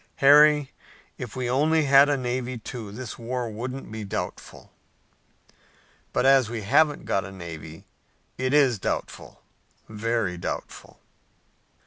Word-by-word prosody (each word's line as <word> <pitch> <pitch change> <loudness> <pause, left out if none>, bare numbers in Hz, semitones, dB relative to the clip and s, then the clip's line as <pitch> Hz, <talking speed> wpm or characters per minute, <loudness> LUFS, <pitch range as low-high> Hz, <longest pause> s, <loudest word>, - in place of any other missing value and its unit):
Harry, 150 0 +5 0.5
if 120 -4 -7
we 130 -1 -2
only 155 +5 +2
had 140 0 +6
a 145 - +1
navy, 125 0 -3
too, 115 -2 -8
this 120 +3 -8
war 120 +1 -3
wouldn't 125 +3 -6
be 110 -1 -6
doubtful." 100 - -6 1.4
"But, - - 0
as 135 -4 +5
we 115 -2 -5
haven't 145 +7 +2
got 95 - 0
a 95 - -9
navy, 80 -3 -9 0.5
it 130 0 -2
is 135 -7 +3
doubtful, - - -5 0.4
very 110 -3 -2
doubtful." - - -7
125 Hz, 125 wpm, -25 LUFS, 110-135 Hz, 1.4 s, had